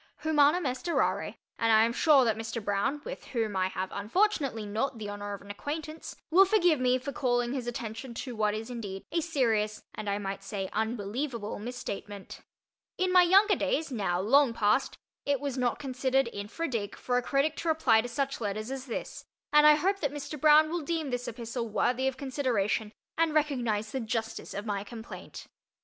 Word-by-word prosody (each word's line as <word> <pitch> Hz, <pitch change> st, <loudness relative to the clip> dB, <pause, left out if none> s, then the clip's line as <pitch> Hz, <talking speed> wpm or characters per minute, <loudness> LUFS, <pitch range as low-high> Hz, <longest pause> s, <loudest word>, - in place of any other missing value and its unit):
Humanum 310 Hz, +2 st, +4 dB
est 255 Hz, +5 st, -3 dB
errare, -, -, 0 dB, 0.2 s
and 230 Hz, -1 st, +3 dB
I 220 Hz, 0 st, +6 dB
am 235 Hz, -, -1 dB
sure 285 Hz, -2 st, +5 dB
that 225 Hz, -2 st, +2 dB
Mr. 225 Hz, +1 st, -4 dB
Broun 215 Hz, +8 st, -1 dB
(with -, -, -7 dB
whom 225 Hz, -5 st, -2 dB
I 185 Hz, 0 st, +2 dB
have 190 Hz, 0 st, -4 dB
unfortunately 255 Hz, -, 0 dB
not 225 Hz, +5 st, -2 dB
the 210 Hz, -2 st, -5 dB
honour 205 Hz, 0 st, -5 dB
of 200 Hz, -, -13 dB
an 200 Hz, -, -8 dB
acquaintance) 310 Hz, +8 st, -6 dB, 0.2 s
will 370 Hz, +4 st, +8 dB
forgive 360 Hz, -7 st, +3 dB
me 255 Hz, 0 st, +3 dB
for 265 Hz, +2 st, -5 dB
calling 245 Hz, -2 st, 0 dB
his 255 Hz, -3 st, -3 dB
attention 235 Hz, +1 st, -5 dB
to 250 Hz, 0 st, -5 dB
what 210 Hz, -1 st, +1 dB
is 220 Hz, +3 st, -5 dB
indeed 200 Hz, -5 st, -6 dB
a 335 Hz, -, +1 dB
serious, 225 Hz, -10 st, 0 dB
and 215 Hz, -1 st, -5 dB
I 200 Hz, -, 0 dB
might 195 Hz, -1 st, -5 dB
say, 195 Hz, -1 st, -4 dB
unbelievable, 220 Hz, +2 st, -3 dB
misstatement. 205 Hz, -4 st, -7 dB, 0.6 s
In 370 Hz, 0 st, +1 dB
my 365 Hz, -, +8 dB
younger 380 Hz, +4 st, +5 dB
days, 325 Hz, -, -1 dB
now 190 Hz, -7 st, 0 dB
long 245 Hz, +4 st, +4 dB
past, 210 Hz, +4 st, +1 dB, 0.3 s
it 285 Hz, -2 st, +1 dB
was 280 Hz, -3 st, -3 dB
not 250 Hz, -2 st, 0 dB
considered 265 Hz, -1 st, 0 dB
infra 210 Hz, +12 st, -4 dB
dig 220 Hz, -6 st, -3 dB
for 245 Hz, -1 st, -1 dB
a -, -, -3 dB
critic 280 Hz, +4 st, +1 dB
to 335 Hz, -, -4 dB
reply 310 Hz, -9 st, +4 dB
to 245 Hz, -, -5 dB
such 275 Hz, +1 st, -2 dB
letters 215 Hz, +3 st, -3 dB
as 270 Hz, 0 st, -5 dB
this, 235 Hz, -, -5 dB, 0.3 s
and 300 Hz, 0 st, +8 dB
I 300 Hz, -, +8 dB
hope 390 Hz, +6 st, +1 dB
that 285 Hz, -6 st, -1 dB
Mr. 290 Hz, 0 st, -6 dB
Broun 310 Hz, 0 st, +6 dB
will 345 Hz, 0 st, -1 dB
deem 315 Hz, -2 st, -2 dB
this 245 Hz, 0 st, -3 dB
epistle 230 Hz, 0 st, -4 dB
worthy 250 Hz, +4 st, +1 dB
of 265 Hz, -1 st, -2 dB
consideration, 245 Hz, -6 st, -1 dB, 0.3 s
and 325 Hz, -2 st, +2 dB
recognize 240 Hz, -8 st, 0 dB
the 265 Hz, -, -2 dB
justice 225 Hz, -1 st, -4 dB
of 205 Hz, +2 st, -4 dB
my 200 Hz, -2 st, -2 dB
complaint. 225 Hz, +2 st, -9 dB
245 Hz, 195 wpm, -29 LUFS, 215-290 Hz, 0.6 s, will